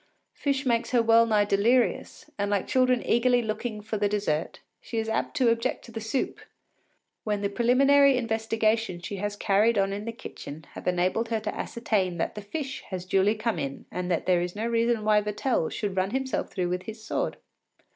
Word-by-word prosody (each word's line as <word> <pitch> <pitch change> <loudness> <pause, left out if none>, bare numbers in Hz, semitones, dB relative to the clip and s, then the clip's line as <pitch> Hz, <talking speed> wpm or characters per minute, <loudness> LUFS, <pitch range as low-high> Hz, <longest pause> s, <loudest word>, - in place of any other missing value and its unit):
Fish 280 -1 -1
makes 235 -2 +1
her 240 -2 +3
well 230 0 +5
nigh 210 -2 +3
delirious, 235 +8 +1
and 200 0 -1
like 205 -2 0
children 255 -1 +2
eagerly 245 +1 +3
looking 215 0 -3
for 215 +1 -4
the 205 0 +2
dessert, 195 -7 -1 0.2
she 230 - -6
is 220 0 -1
apt 220 +6 -2
to 255 -4 +4
object 230 +3 -1
to 235 - -12
the 225 0 -5
soup, 225 +4 -2 0.8
when 210 -2 -1
the 200 - 0
preliminary 275 +4 +5
investigations 225 -4 0
she 200 - -5
has 205 +1 -3
carried 205 +3 +2
on 195 0 +1
in 205 +1 -5
the 230 - -3
kitchen 160 -8 -9
have - - -9
enabled 185 +6 +1
her 225 -1 0
to 215 0 -4
ascertain 200 -7 -1
that 165 - -1
the 210 - -7
fish 265 +6 -5
has 185 -2 -5
duly 195 +3 +2
come 225 +1 -1
in 140 0 -5
and 180 0 -3
that 170 -3 0
there 180 -2 +3
is 180 +1 -4
no 215 +2 -2
reason 230 -1 +1
why 210 0 +4
Vatel 210 -2 -1
should 200 -3 -3
run 190 0 +1
himself 265 +3 -2
through 180 -3 -2
with 180 0 -1
his 220 0 -8
sword. 220 - -2
220 Hz, 200 wpm, -27 LUFS, 200-235 Hz, 0.8 s, well